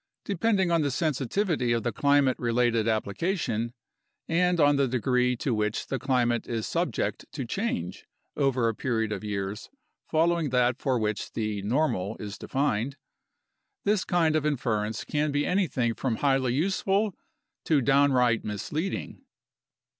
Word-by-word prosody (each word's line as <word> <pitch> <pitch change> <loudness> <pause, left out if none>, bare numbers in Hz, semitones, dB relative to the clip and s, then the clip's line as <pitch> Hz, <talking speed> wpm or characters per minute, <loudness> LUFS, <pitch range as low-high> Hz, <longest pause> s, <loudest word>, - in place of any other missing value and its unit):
Depending 195 -2 +1
on 165 -1 +3
the 145 - +1
sensitivity 145 - 0
of 115 -2 0
the 120 - 0
climate 140 -2 +2
related 120 -1 +1
applica 115 - 0
tion 115 -6 -2 0.6
(and 180 +1 +2
on 145 -1 +5
the 140 -1 +2
degree 125 0 +1
to 125 +1 -1
which 105 -1 -1
the 135 - -3
climate 120 -2 +1
is 115 -2 -2
subject - - -2
to - - -4
change 85 +2 -3 0.3
over 130 -4 +2
a 115 - +1
period 110 -2 -1
of 105 - -4
years 105 0 -4 0.4
following 165 -1 +2
that 125 0 +2
for 130 -2 +1
which 105 -2 -2
the 105 -2 -2
"normal" 105 -4 0
is 100 -1 -7
defined), 135 -1 -1 0.9
this 205 -1 +2
kind 165 -3 +2
of 155 - +1
inference 110 -7 -1
can 150 0 -1
be 145 +1 0
anything 150 -11 +1
from 120 0 -2
highly 135 -2 +1
useful 195 +5 +1 0.5
to 155 -3 +3
downright 130 -3 +3
misleading. 150 - -4
130 Hz, 145 wpm, -27 LUFS, 115-155 Hz, 0.9 s, on